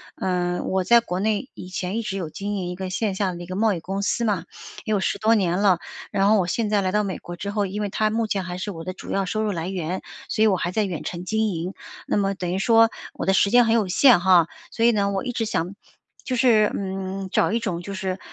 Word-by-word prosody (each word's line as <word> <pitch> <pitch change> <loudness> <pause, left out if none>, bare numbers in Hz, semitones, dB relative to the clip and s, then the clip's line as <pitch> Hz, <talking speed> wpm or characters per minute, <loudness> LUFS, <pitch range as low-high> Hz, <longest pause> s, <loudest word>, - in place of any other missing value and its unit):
呃， 180 -1 -1
我 190 0 0
在 235 0 +6
国 180 -5 -3
内 220 +5 0
以 180 - -9
前 185 +2 -3
一 - - 0
直 210 -3 -4
有 170 -5 -4
经 205 +5 -4
营 185 -3 -3
一 180 - -4
个 185 0 -5
线 200 +1 -1
下 190 -2 0
的 175 0 -7
一 - - -7
个 185 - -6
贸 220 0 +3
易 175 - -3
公 195 +2 -3
司 205 +3 0
嘛， 200 -6 0 0.4
也 - - -2
有 205 - +2
10 - - 0
多 220 +2 +4
年 180 -3 +1
了。 195 -4 +4 0.3
然 195 +1 +2
后 215 - +5
我 180 - 0
现 215 +4 -1
在 210 -1 +2
来 185 -1 -1
到 210 0 +2
美 190 -2 -3
国 175 - -8
之 200 +3 -5
后， 205 -1 0
因 200 +2 -4
为 205 - -1
它 215 +2 +1
目 225 +1 0
前 195 -3 -2
还 180 0 -5
是 205 +3 -4
我 165 -2 -8
的 185 - -4
主 - - -9
要 195 0 0
收 215 +3 -1
入 215 - 0
来 170 -2 -3
源， 185 -1 -3 0.3
所 215 - -1
以 - - +6
我 200 - +3
还 175 0 -2
在 210 +2 +1
远 175 -5 -4
程 175 0 -5
经 220 +2 +1
营。 175 +1 -3 0.3
那 - - 0
么 195 -1 +1
等 180 -2 -3
于 - - 0
说 225 +2 +5 0.2
我 - - -4
的 190 - +3
时 200 +1 +4
间 245 0 +6
很 225 - +2
有 215 -4 +2
限 235 +1 +6
哈。 180 -3 +5 0.2
所 230 0 +1
以 235 - +6
呢 200 -2 +1
我 195 -1 -2
一 245 - -3
直 230 - -1
想， 185 -2 -2 0.5
就 255 - -2
是， 225 -4 +4
嗯， 190 0 -4
找 - - +2
一 230 - +2
种 180 -7 -3
就 200 +3 -7
是， 190 -1 -3
195 Hz, 300 characters per minute, -23 LUFS, 185-215 Hz, 0.5 s, 在